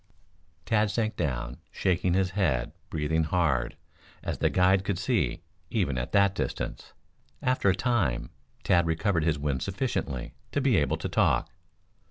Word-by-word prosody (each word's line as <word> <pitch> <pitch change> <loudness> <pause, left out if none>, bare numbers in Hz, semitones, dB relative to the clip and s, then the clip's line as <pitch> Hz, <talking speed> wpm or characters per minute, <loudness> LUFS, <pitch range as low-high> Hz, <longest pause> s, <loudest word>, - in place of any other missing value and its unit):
Tad 110 -1 +2
sank 110 +1 -1
down, 60 -5 -2
shaking 90 -1 +1
his 95 -1 +1
head, 80 - 0 0.2
breathing 80 +1 0
hard, 75 -7 +1 0.5
as - - -3
the - - +3
guide 95 +1 +3
could 100 -2 -1
see, - - 0 0.3
even 70 - 0
at 60 0 -3
that 100 -1 +4
distance. - - -4 0.5
After 125 -5 +2
a 95 - +3
time 100 - 0 0.3
Tad 85 -1 +3
recovered 80 0 +1
his 80 -3 +2
wind 70 -3 -1
sufficiently 65 -3 -2 0.2
to - - +2
be 135 -6 +3
able 75 - +1
to - - -3
talk. - - +2
85 Hz, 150 wpm, -28 LUFS, 75-100 Hz, 0.5 s, that